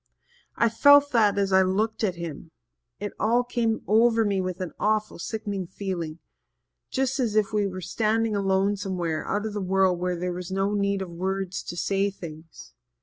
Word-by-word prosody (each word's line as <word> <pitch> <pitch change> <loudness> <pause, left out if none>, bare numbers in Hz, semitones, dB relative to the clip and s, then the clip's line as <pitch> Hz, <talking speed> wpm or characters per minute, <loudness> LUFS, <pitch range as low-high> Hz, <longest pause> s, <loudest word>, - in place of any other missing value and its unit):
I 235 - +3
felt 285 +5 +6
that 210 -4 +3
as 195 -1 +1
I 190 - +6
looked 210 +5 0
at 190 -4 +1
him 170 -2 -7 0.5
it 205 0 -4
all 235 +3 +3
came 235 -2 -1
over 225 +1 +4
me 200 -2 +1
with 185 0 -4
an 180 -3 -4
awful 215 -2 0
sickening 205 -2 -4
feeling 175 -4 -4 0.7
just 265 0 -1
as 230 -5 0
if 215 0 +2
we 205 -1 +2
were 185 -1 -6
standing 220 +2 0
alone 195 +1 +1
somewhere 175 -5 -2
out 205 +2 -1
of 215 - -4
the 205 - -3
world 190 -1 +2
where 180 0 -1
there 180 +1 -2
was 180 0 -6
no 195 +2 0
need 200 -1 0
of 180 - -9
words 190 +2 -3
to 175 - -7
say 195 +3 +1
things. 160 -4 -11
195 Hz, 185 wpm, -26 LUFS, 185-215 Hz, 0.7 s, felt